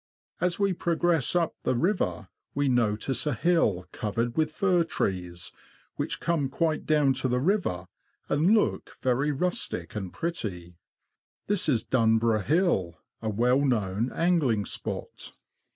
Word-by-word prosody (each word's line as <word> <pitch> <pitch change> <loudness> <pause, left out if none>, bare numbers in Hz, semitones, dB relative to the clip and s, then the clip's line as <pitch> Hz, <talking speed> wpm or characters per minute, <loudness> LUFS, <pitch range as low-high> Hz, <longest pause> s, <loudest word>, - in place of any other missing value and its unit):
As 180 0 +1
we 200 -2 +2
progress 170 -3 +1
.up 170 -2 +2
the - - 0
river, 120 - 0 0.3
we 145 0 +1
notice 120 +3 +1
a 145 - +1
hill 115 - +2
covered 115 +2 -2
with 155 -1 +2
fir 180 +2 +2
trees, 90 - -3 0.4
which - - -3
come 160 -5 0
quite 160 +2 -1
down 150 -3 +4
to 130 - -1
the 125 0 +1
river, 150 - 0 0.4
and 165 +9 +3
look - - -1
very 130 +4 +2
rustic 135 - -2
and 95 -4 -4
pretty. 95 - -4 0.7
This 205 -6 +1
is 120 -6 +2
Dunburgh 115 -3 +2
Hill, 140 - +1 0.2
a 110 - -2
well 120 +5 +2
known 115 -3 0
angling 150 - +1
spot. - - -5
130 Hz, 135 wpm, -27 LUFS, 105-170 Hz, 0.7 s, down